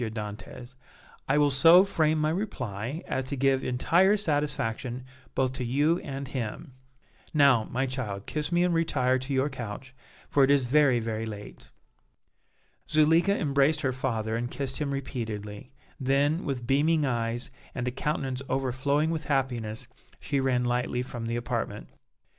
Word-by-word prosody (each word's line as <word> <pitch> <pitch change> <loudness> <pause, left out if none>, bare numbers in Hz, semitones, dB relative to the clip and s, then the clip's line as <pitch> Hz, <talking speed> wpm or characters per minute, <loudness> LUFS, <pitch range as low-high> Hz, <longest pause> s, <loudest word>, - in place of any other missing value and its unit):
Dantès, 110 +3 -6 0.6
"I 140 - +3
will 145 -1 +4
so 165 +7 +8
frame 160 -5 +1
my 155 0 +1
reply 135 - -4
as 130 - -2
to 140 +2 -3
give 135 0 +2
entire 175 +11 +3
satisfaction 135 - -2 0.3
both 130 -1 +1
to 130 - -2
you 145 +8 +2
and 135 0 -6
him. 130 +2 -5 0.6
Now, 140 -7 +5
my 130 +3 -1
child, 120 -7 -4
kiss 150 +1 -3
me 175 +1 +3
and 180 -1 +2
retire 130 -6 +1
to 130 +2 -6
your 130 +2 +2
couch, 130 -1 -7 0.3
for 140 - +3
it 135 - +4
is 140 -2 +4
very, 135 -1 +4
very 110 0 -3
late." 105 -1 -9 1.2
Zuleika 165 +6 +4
embraced 140 +1 +2
her 130 -2 0
father 115 -4 -2
and 120 +1 -2
kissed 135 0 -3
him 150 -2 -2
repeatedly; 115 -5 -5 0.3
then, 140 +5 +1
with 130 -4 -3
beaming 150 +4 +2
eyes 120 -1 -1 0.2
and 125 0 -2
a - - 0
countenance 135 -1 -2
overflowing 135 +4 0
with 160 -1 -3
happiness 120 -6 -2 0.3
she 140 -1 -1
ran 130 -2 +1
lightly 125 0 0
from 120 -2 -6
the 115 - -2
apartment. 120 0 -3
130 Hz, 155 wpm, -27 LUFS, 120-145 Hz, 1.2 s, so